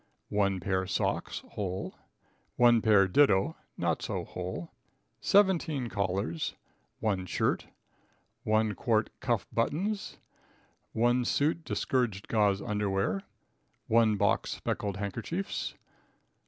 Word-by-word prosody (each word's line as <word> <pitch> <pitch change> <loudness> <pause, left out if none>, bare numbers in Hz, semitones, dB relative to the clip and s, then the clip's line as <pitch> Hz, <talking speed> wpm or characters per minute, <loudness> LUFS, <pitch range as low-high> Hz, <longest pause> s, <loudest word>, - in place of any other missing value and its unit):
1 100 -2 +1
pair 95 +1 -1
Socks - - -1
(whole). 95 -2 -4 0.6
1 120 -2 +5
pair 105 -4 +5
do. 95 -3 +4 0.2
(not - - 0
so - - -3
whole). 90 -2 -6 0.5
17 165 - +3
Collars. 95 -4 -2 0.5
1 95 -4 0
Shirt - - 0 0.8
1 110 0 +2
quart 110 +2 +1
Cuff 120 -5 0
Buttons. 190 - -1 0.8
1 120 +2 +3
suit 155 +6 +1
discouraged 120 -11 -1
Gauze 105 -3 +2
Underwear. 100 -2 0 0.7
1 110 -1 +4
box - - +2
Speckled 100 -2 -3
Handkerchiefs. 115 - -3
105 Hz, 100 wpm, -30 LUFS, 95-120 Hz, 0.8 s, 1